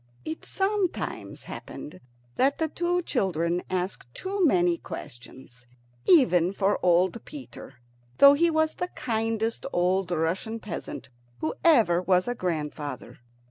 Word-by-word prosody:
It 315 0 -5
sometimes 390 -2 -2
happened 150 - -9 0.4
that 275 +2 +2
the 320 - 0
two 350 +3 -1
children 175 - 0
asked 185 -8 -3
too 390 0 -2
many 175 - +3
questions 125 0 -10 0.4
even 185 - +5
for 200 +1 +1
old 180 +5 +3
Peter, 275 - -10 0.4
though 280 0 +9
he 335 +4 +3
was 315 -1 +1
the 360 - -3
kindest 225 0 -2
old 180 +1 +1
Russian 175 +7 -1
peasant 195 -9 -7 0.3
who 155 +6 -2
ever 225 - +5
was 185 +1 +2
a 245 - 0
grandfather. 150 - -4
195 Hz, 125 wpm, -26 LUFS, 175-285 Hz, 0.4 s, though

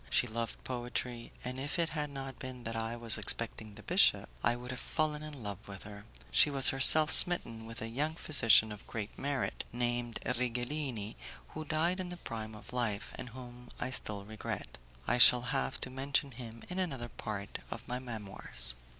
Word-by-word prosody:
She - - +4
loved 115 0 -5
poetry, 120 -1 -4
and 125 +1 -4
if 145 +5 -3
it 165 -1 +1
had 150 -2 -3
not 135 -2 -7
been 130 -2 -7
that 115 0 -4
I 115 +1 -2
was 115 -2 +4
expecting 110 0 0
the - - -12
bishop, - - +4 0.2
I 120 +1 +3
would 125 +1 -7
have 130 - -5
fallen 150 -1 -1
in 150 -5 -8
love 100 0 -6
with 95 -2 -8
her. 100 0 -10 0.3
She - - +6
was 135 -2 +6
herself 150 +4 +6
smitten 115 -11 +5
with 115 0 -7
a - - -4
young 145 +7 -2
physician 115 -9 +5
of 105 - -9
great 105 -2 -5
merit, 140 -1 -2
named 120 -1 -1
Righelini, 120 -2 -2 0.3
who 155 0 -7
died 165 +5 0
in 185 -1 -3
the 180 - -7
prime 110 -7 -6
of 105 - -12
life, 110 -5 -2
and 125 - -7
whom 125 0 -11
I 130 - -3
still 105 -5 +1
regret. 110 - -6 0.3
I 125 - +2
shall 125 +1 +9
have 135 0 -1
to 130 - -4
mention 140 +2 0
him 115 -2 -9
in 180 +1 -4
another 135 -10 -2
part 105 -4 -6
of 115 0 -7
my 125 0 -3
Memoirs. 105 - -2
120 Hz, 190 wpm, -33 LUFS, 115-140 Hz, 0.3 s, shall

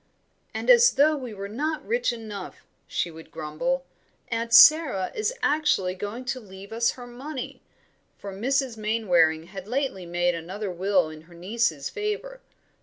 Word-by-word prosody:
"And - - -5
as 475 -1 +7
though 300 +3 +4
we 255 -5 -6
were 200 -1 -6
not 300 +9 -3
rich 475 - +1
enough," 215 -5 -8 0.2
she 175 - -2
would 160 0 -12
grumble, 255 - -2 0.4
"Aunt 230 0 -2
Sara 255 - +7
is 430 +2 -1
actually 295 -12 +2
going 205 +7 -6
to 255 +1 -2
leave 195 -1 -12
us 235 +1 +2
her 245 - -10
money" 255 +2 -7 0.6
for 200 -1 -8
Mrs. 255 +3 0
Mainwaring 180 -8 +2
had 190 +2 -9
lately 245 -7 -2
made 175 +1 +1
another 185 +5 -5
will 185 -1 +1
in 155 0 -11
her 170 - -15
nieces' 180 -5 -1
favour. 425 +4 -4
220 Hz, 155 wpm, -25 LUFS, 185-270 Hz, 0.6 s, as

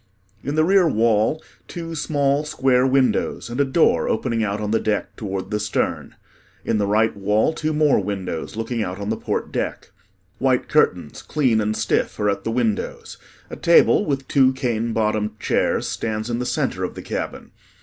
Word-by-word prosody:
In 140 +2 -3
the 155 - +3
rear 190 +1 +4
wall, 115 +4 +2 0.2
two 165 -1 -6
small 145 -2 0
square 130 -3 +2
windows 130 -2 +1
and 125 +4 0
a - - +5
door 140 +4 +2
opening 115 0 0
out 100 0 -2
on 105 0 -3
the 115 - +2
deck 105 -1 -2
toward 95 -2 -5
the 105 - 0
stern. 105 -1 -2 0.5
In 110 - +1
the 100 - 0
right 110 +2 +2
wall, 105 +8 +1
two 155 0 -2
more 150 -2 +3
windows 95 -3 -4
looking 115 +1 -3
out 90 -2 -3
on 100 +1 -4
the - - 0
port - - -3
deck. - - -4 0.5
White 130 -1 +1
curtains, 90 - +1
clean 130 -7 +1
and 105 +1 -1
stiff, - - -1
are 105 -1 +2
at 100 - -4
the - - -1
windows. 115 -3 -2 0.3
A - - -5
table 170 +4 +4
with 135 -6 -2
two 130 -2 +4
cane 120 -3 -1
bottomed 105 -1 -1
chairs - - 0
stands 110 +1 -3
in 120 - -1
the 125 - -2
center - - -1
of - - -4
the - - -8
cabin. - - -5
115 Hz, 185 wpm, -22 LUFS, 105-140 Hz, 0.5 s, a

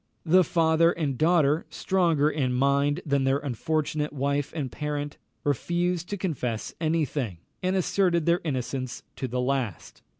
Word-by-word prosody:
The 180 +3 +6
father 165 0 +3
and 150 -6 -2
daughter, 155 0 +3
stronger 170 -6 +2
in 140 -5 0
mind 140 +2 +2
than 140 -2 +1
their 135 +1 +3
unfortunate 150 +3 -1
wife 140 0 -1
and 140 -6 -3
parent, 145 -1 -4 0.3
refused 175 +5 0
to 205 - -2
confess 125 - -3
any 160 0 +2
thing, 120 - -3 0.2
and 185 +1 0
asserted 180 -3 +2
their 170 +2 +3
innocence 130 -3 -3
to 130 - -2
the 125 +1 -2
last. 125 -7 -2
150 Hz, 145 wpm, -27 LUFS, 135-170 Hz, 0.3 s, The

